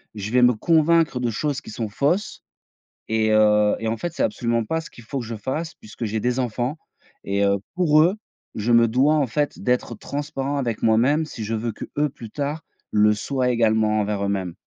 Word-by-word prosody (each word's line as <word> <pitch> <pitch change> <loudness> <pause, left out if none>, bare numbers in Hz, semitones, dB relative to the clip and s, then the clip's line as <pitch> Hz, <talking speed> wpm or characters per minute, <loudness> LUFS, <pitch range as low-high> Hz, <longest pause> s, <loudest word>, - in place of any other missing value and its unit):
Je 105 0 -5
vais 125 0 +4
me 125 0 +6
convaincre 160 +2 +2
de 120 -2 -1
choses 145 +5 -2
qui - - -10
sont 110 -1 -4
fausses 150 - -1 0.7
et 110 0 +1
heu, 105 -1 +4
et 115 - -3
en 115 - -2
fait, 175 +5 -4
c'est - - -1
absolument 115 -1 0
pas 160 +9 -1
ce - - -11
qu'il 120 - -15
faut 135 +5 -4
que 120 - -5
je 115 0 -5
fasse, 140 +10 -4
puisque 110 +2 -8
j'ai 110 +1 -2
des 125 +1 0
enfants 125 +4 -2 0.5
et 100 +1 0
heu, 100 0 +2 0.2
pour 155 -4 +4
eux, 175 +5 +3 0.4
je 110 +3 -1
me 115 0 +6
dois, 135 +7 +3
en 145 -3 +2
fait, 145 +5 -2
d'être 125 -1 0
transparent 140 +3 -4
avec 120 -5 -2
moi-même, 125 +8 +3
si 125 -7 -7
je 110 +2 -3
veux 110 0 -3
qu'eux 150 +5 -2
plus 115 -3 -11
tard 145 +6 -3 0.3
le 105 0 +4
soient 125 +4 -1
également 110 -2 +2
envers 100 -1 -1
eux-mêmes. 95 -3 -2
120 Hz, 210 wpm, -23 LUFS, 110-145 Hz, 0.7 s, me